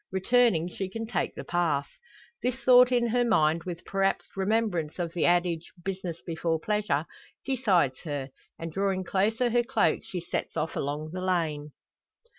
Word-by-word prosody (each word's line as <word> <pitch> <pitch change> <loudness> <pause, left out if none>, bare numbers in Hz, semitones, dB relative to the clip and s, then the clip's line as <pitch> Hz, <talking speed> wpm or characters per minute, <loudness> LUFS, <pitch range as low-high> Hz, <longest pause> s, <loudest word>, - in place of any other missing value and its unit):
Returning 190 -2 +3
she 190 +2 -5
can 225 +3 -5
take 220 -4 -2
the - - -6
path. 160 -5 0 0.5
This 250 -1 0
thought 250 -1 +6
in 240 -1 +2
her 245 +2 +2
mind, 165 -8 +2
with, 175 -2 -6
perhaps, 195 0 -1
remembrance 195 -5 0
of 170 -2 -3
the 170 - +1
adage, 175 -1 +1
`business 185 -3 -3
before 165 -1 -1
pleasure,' 205 -6 0 0.4
decides 200 - +2
her; 145 -4 -5 0.3
and 165 0 -6
drawing 195 0 0
closer 220 +6 +1
her 240 +1 +4
cloak, 265 +3 +2
she 180 - -5
sets 170 - -4
off 160 - -2
along 150 +2 -3
the 185 - -4
lane. 155 -5 -1
185 Hz, 160 wpm, -28 LUFS, 165-220 Hz, 0.5 s, thought